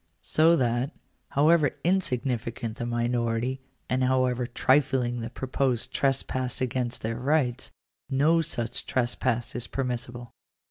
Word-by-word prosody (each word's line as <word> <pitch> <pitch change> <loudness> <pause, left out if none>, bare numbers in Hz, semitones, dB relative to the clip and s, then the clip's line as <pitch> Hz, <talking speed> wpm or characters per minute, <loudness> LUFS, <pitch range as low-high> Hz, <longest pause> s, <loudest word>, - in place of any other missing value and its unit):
So 165 +2 +5
that, 125 +1 0 0.3
however 150 +1 +4
insignificant 125 -9 -1
the 120 - -3
minority, 120 +1 -1 0.3
and 130 0 +1
however 125 -1 +1
trifling 130 -1 +2
the 115 - -4
proposed 130 -1 -1
trespass 130 -2 0
against 125 -1 -2
their 115 +1 -2
rights, 130 -2 0 0.4
no 150 +5 +3
such 120 -7 -3
trespass 120 -1 0
is 120 -1 -3
permissible. 120 -2 -4
125 Hz, 110 wpm, -27 LUFS, 120-135 Hz, 0.4 s, So